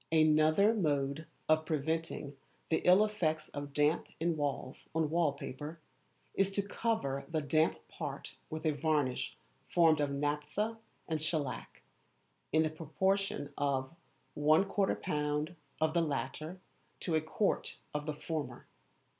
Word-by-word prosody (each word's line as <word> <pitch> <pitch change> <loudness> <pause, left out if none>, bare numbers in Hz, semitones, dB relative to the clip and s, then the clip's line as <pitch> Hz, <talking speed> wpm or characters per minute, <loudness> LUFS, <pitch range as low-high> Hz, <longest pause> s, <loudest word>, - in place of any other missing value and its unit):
Another 155 +6 +5
mode 150 -5 0 0.2
of 155 0 +4
preventing 160 -1 -2 0.4
the 160 - +4
ill 185 +4 +7
effects 160 -7 -1
of 145 0 -6
damp 150 +3 +2
in 165 +1 +1
walls 145 -3 -3
on 160 -2 +1
wall 165 -3 +3
paper, 145 +3 -7 0.5
is 195 0 +3
to 200 - +1
cover 170 -13 -1
the 160 - +1
damp 155 +2 +2
part - - -6 0.2
with 155 +1 -5
a 155 - +4
varnish 145 -4 0 0.3
formed 165 -3 +5
of 145 -1 +2
naphtha 150 +10 -1 0.3
and 160 -2 -1
shellac, 155 -4 -3 0.7
in 160 0 +4
the 155 - 0
proportion 165 -1 0
of 135 0 0 0.4
1/4lb. 155 -2 +2 0.2
of 155 0 +2
the 170 - +3
latter 155 +3 -3 0.4
to 170 - -2
a 155 - +3
quart 175 +6 0 0.2
of 150 +1 -3
the 155 - -1
former. 155 0 -4
155 Hz, 130 wpm, -33 LUFS, 145-165 Hz, 0.7 s, ill